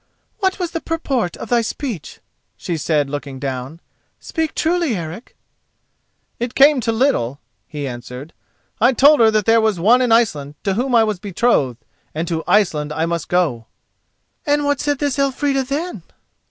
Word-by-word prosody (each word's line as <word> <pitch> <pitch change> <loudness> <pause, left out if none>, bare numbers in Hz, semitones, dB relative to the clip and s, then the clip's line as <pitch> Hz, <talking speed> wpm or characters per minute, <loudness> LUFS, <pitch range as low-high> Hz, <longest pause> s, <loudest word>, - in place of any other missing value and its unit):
"What 380 -2 +1
was 355 -3 -3
the 330 - -4
purport 270 - -2
of - - -8
thy 240 -1 +3
speech?" 225 - -5 0.4
she 175 - -3
said, 150 -2 0
looking 140 -1 -6
down. 130 +3 -5 0.4
"Speak 320 -2 -3
truly, 330 -6 +1
Eric." 170 +6 -7 1.0
"It 240 +1 -3
came 280 -1 +6
to 230 - 0
little," 220 - 0 0.3
he 145 -2 -5
answered. 125 +4 -8 0.5
"I 245 +3 +4
told 290 +5 +6
her 225 -1 +6
that 215 -2 +1
there 225 0 +4
was 215 -5 +1
one 230 +8 +5
in 245 -2 +1
Iceland 155 -12 +2
to 195 - 0
whom 245 +4 0
I 230 - +6
was 215 -4 -2
betrothed, 180 - 0 0.3
and 165 +2 -2
to 165 -1 -2
Iceland 155 -8 +2
I 160 +2 -1
must 170 0 -3
go." 155 -11 0 0.8
"And 290 0 +1
what 285 -1 +1
said 290 -1 0
this 285 -1 -1
Elfrida, 275 0 +1
then?" 305 +7 -4
220 Hz, 165 wpm, -19 LUFS, -, 1.0 s, came